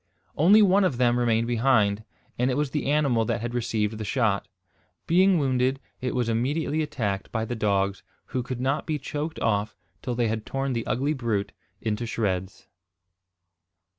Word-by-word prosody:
Only 200 Hz, +8 st, +6 dB
one 195 Hz, +1 st, +4 dB
of 155 Hz, -10 st, +1 dB
them 120 Hz, -1 st, +3 dB
remained 115 Hz, -1 st, +2 dB
behind, 110 Hz, -4 st, +2 dB, 0.4 s
and 125 Hz, +1 st, +2 dB
it 130 Hz, -, 0 dB
was 145 Hz, -2 st, 0 dB
the 150 Hz, -2 st, -1 dB
animal 140 Hz, -6 st, +2 dB
that 115 Hz, -, -1 dB
had 120 Hz, +1 st, -4 dB
received 110 Hz, -2 st, -1 dB
the -, -, -3 dB
shot. 105 Hz, -4 st, 0 dB, 0.6 s
Being 185 Hz, +2 st, +4 dB
wounded, 130 Hz, -2 st, +1 dB, 0.2 s
it 125 Hz, -, -2 dB
was 125 Hz, -2 st, 0 dB
immediately 145 Hz, +7 st, 0 dB
attacked 115 Hz, -11 st, -3 dB
by 110 Hz, -1 st, -1 dB
the 120 Hz, -, -4 dB
dogs, 100 Hz, -2 st, 0 dB, 0.3 s
who 130 Hz, -, 0 dB
could 125 Hz, 0 st, -5 dB
not 135 Hz, +3 st, -1 dB
be 155 Hz, -2 st, 0 dB
choked 150 Hz, +3 st, -4 dB
off 105 Hz, -1 st, 0 dB, 0.3 s
till 125 Hz, -2 st, -3 dB
they 120 Hz, -1 st, +1 dB
had 110 Hz, 0 st, -2 dB
torn 135 Hz, 0 st, -2 dB
the 115 Hz, -1 st, -3 dB
ugly 140 Hz, +6 st, 0 dB
brute 110 Hz, -7 st, -2 dB, 0.3 s
into 110 Hz, +1 st, -2 dB
shreds. 95 Hz, -5 st, -2 dB
120 Hz, 170 wpm, -26 LUFS, 110-140 Hz, 0.6 s, Only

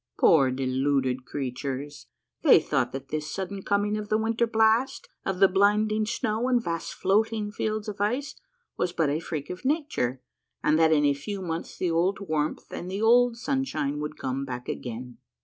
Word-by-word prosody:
Poor 140 Hz, -5 st, +6 dB
deluded 130 Hz, 0 st, 0 dB
creatures! 135 Hz, +2 st, -5 dB, 0.3 s
they -, -, +7 dB
thought -, -, 0 dB
that 135 Hz, 0 st, -7 dB
this 150 Hz, 0 st, -3 dB
sudden 195 Hz, +2 st, -4 dB
coming 205 Hz, +2 st, +1 dB
of 210 Hz, -1 st, -6 dB
the 215 Hz, -, +3 dB
winter 225 Hz, +1 st, +1 dB
blast, 225 Hz, +4 st, +2 dB, 0.2 s
of 195 Hz, -1 st, -1 dB
the 195 Hz, +1 st, +7 dB
blinding 210 Hz, +3 st, +2 dB
snow 220 Hz, +1 st, -1 dB
and 245 Hz, -2 st, +2 dB
vast 165 Hz, -3 st, -3 dB
floating 210 Hz, +2 st, +1 dB
fields 215 Hz, 0 st, -2 dB
of 205 Hz, -1 st, -5 dB
ice, 250 Hz, +8 st, 0 dB, 0.4 s
was 175 Hz, -, 0 dB
but 160 Hz, -5 st, +1 dB
a 150 Hz, -, 0 dB
freak 155 Hz, -2 st, -5 dB
of 180 Hz, -, -8 dB
nature, 265 Hz, -, 0 dB, 0.4 s
and 155 Hz, +1 st, +3 dB
that 160 Hz, -1 st, +5 dB
in 150 Hz, -2 st, +4 dB
a 145 Hz, -, +4 dB
few 195 Hz, +9 st, -5 dB
months 170 Hz, -3 st, -5 dB
the 180 Hz, -, 0 dB
old 180 Hz, +4 st, +1 dB
warmth 155 Hz, -6 st, -2 dB
and 180 Hz, -, -5 dB
the 195 Hz, +2 st, -3 dB
old 235 Hz, +2 st, +4 dB
sunshine 245 Hz, -, -1 dB
would 150 Hz, 0 st, -5 dB
come 135 Hz, +1 st, -3 dB
back 125 Hz, -2 st, -6 dB
again. 125 Hz, 0 st, -6 dB
180 Hz, 180 wpm, -27 LUFS, 145-215 Hz, 0.4 s, they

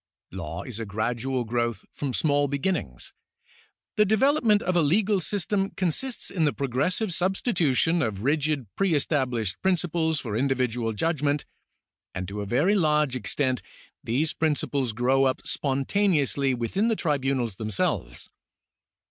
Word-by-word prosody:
Law 85 Hz, -3 st, -5 dB
is 120 Hz, -4 st, -6 dB
a 115 Hz, -, -3 dB
gradual 120 Hz, +5 st, -1 dB
growth 120 Hz, -2 st, -2 dB
from 140 Hz, -2 st, -3 dB
small 145 Hz, +2 st, +2 dB
beginnings. 140 Hz, -, -2 dB, 0.8 s
The 210 Hz, -, +6 dB
development 220 Hz, 0 st, +3 dB
of 185 Hz, 0 st, 0 dB
a 175 Hz, -, +4 dB
legal 195 Hz, +6 st, +2 dB
system 195 Hz, +2 st, 0 dB
consists 195 Hz, -, -1 dB
in 175 Hz, -4 st, 0 dB
the 150 Hz, -, +3 dB
progressive 150 Hz, -, -1 dB
substitution 175 Hz, -, +1 dB
of 105 Hz, -5 st, -2 dB
rigid 145 Hz, -1 st, +1 dB
pre 195 Hz, -4 st, +2 dB
established 125 Hz, -, 0 dB
principles 170 Hz, -4 st, +1 dB
for 115 Hz, -6 st, -4 dB
individual 125 Hz, -3 st, 0 dB
judgment, 145 Hz, +3 st, 0 dB, 0.7 s
and 90 Hz, -1 st, -3 dB
to 105 Hz, +1 st, -4 dB
a 100 Hz, -, -5 dB
very 145 Hz, -, +2 dB
large 150 Hz, -7 st, +2 dB
extent 130 Hz, +2 st, 0 dB, 0.4 s
these 145 Hz, +7 st, 0 dB
principles 145 Hz, -5 st, 0 dB
grow 130 Hz, +4 st, +2 dB
up 130 Hz, -1 st, -1 dB
spontaneously 140 Hz, -1 st, +1 dB
within 125 Hz, -, 0 dB
the 225 Hz, -, +2 dB
tribunals 135 Hz, -, -1 dB
themselves. 95 Hz, -, -2 dB
140 Hz, 130 wpm, -26 LUFS, 120-175 Hz, 0.8 s, The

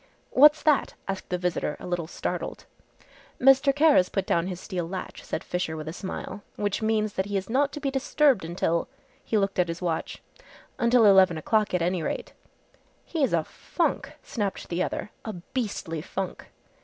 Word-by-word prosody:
"What's 295 Hz, +3 st, +6 dB
that?" 300 Hz, -3 st, +2 dB
asked 195 Hz, -1 st, -4 dB
the 180 Hz, -, 0 dB
visitor 175 Hz, -4 st, -2 dB
a -, -, -9 dB
little 175 Hz, -2 st, -2 dB
startled. -, -, -4 dB, 0.7 s
"Mr. 270 Hz, +1 st, +6 dB
Kara's 290 Hz, -10 st, +4 dB
put 195 Hz, -, -1 dB
down 170 Hz, +1 st, +1 dB
his 180 Hz, -2 st, -5 dB
steel 180 Hz, -4 st, -4 dB
latch," 185 Hz, 0 st, -6 dB
said -, -, -4 dB
Fisher 180 Hz, -3 st, -2 dB
with 155 Hz, 0 st, -6 dB
a 160 Hz, -, -4 dB
smile, 190 Hz, +2 st, -6 dB
"which 205 Hz, +1 st, -1 dB
means 215 Hz, -1 st, +1 dB
that 190 Hz, +1 st, -1 dB
he 205 Hz, -1 st, -1 dB
is 190 Hz, +3 st, -4 dB
not 280 Hz, +3 st, +2 dB
to -, -, -5 dB
be 275 Hz, -2 st, -1 dB
disturbed 270 Hz, -, +2 dB
until 170 Hz, 0 st, -1 dB, 0.2 s
" -, -, -34 dB
he 220 Hz, -, 0 dB
looked 195 Hz, -2 st, 0 dB
at 180 Hz, -, +3 dB
his 165 Hz, 0 st, -4 dB
watch, 170 Hz, -3 st, -3 dB, 0.6 s
"until 235 Hz, -1 st, +5 dB
eleven 190 Hz, -4 st, +6 dB
o'clock 210 Hz, +4 st, +1 dB
at 175 Hz, -, +1 dB
any 180 Hz, 0 st, 0 dB
rate." -, -, -4 dB, 0.7 s
"He's 300 Hz, -7 st, 0 dB
a 165 Hz, -2 st, +2 dB
funk!" -, -, -2 dB
snapped 205 Hz, -4 st, -3 dB
the 175 Hz, +1 st, -1 dB
other, 210 Hz, -, -3 dB
"a 220 Hz, -, -5 dB
beastly 180 Hz, -4 st, -4 dB
funk!" 190 Hz, +2 st, -5 dB
195 Hz, 180 wpm, -26 LUFS, 175-235 Hz, 0.7 s, What's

